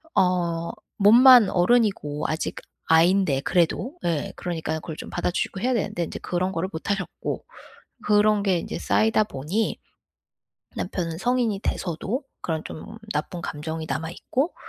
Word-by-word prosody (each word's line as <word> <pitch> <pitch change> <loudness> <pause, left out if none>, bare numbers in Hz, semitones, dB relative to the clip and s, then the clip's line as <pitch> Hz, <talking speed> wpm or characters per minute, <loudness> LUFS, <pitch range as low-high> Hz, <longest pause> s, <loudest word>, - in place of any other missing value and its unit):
어 170 -2 +1 0.3
몸만 235 +2 +8
어른이고 180 -7 +2
아직 155 - -2 0.3
아이인데 165 -3 +4
그래도. 180 - 0
예 165 -4 -1
그러니까는 160 -2 -3
그걸 160 - -7
좀 - - -8
받아 - - -1
주시고 190 - -2
해야 255 +3 +1
되는데 185 -6 -1
인제 - - -7
그런 180 +1 -1
거를 170 +3 -2
못 160 - -5
하셨고, 195 -4 -4 0.6
그런 210 0 +4
게 190 -3 +2
인제 - - -5
쌓이다 220 -1 +3
보니 185 +7 -2 1.0
남편은 170 -3 -3
성인이 235 -2 0
돼서도 195 - -3 0.2
그런 160 -2 -2
좀 215 +7 -9 0.2
나쁜 170 +3 -3
감정이 160 +2 -5
남아 160 +1 -2
있고 270 - -2
180 Hz, 310 characters per minute, -24 LUFS, 165-215 Hz, 1.0 s, 몸만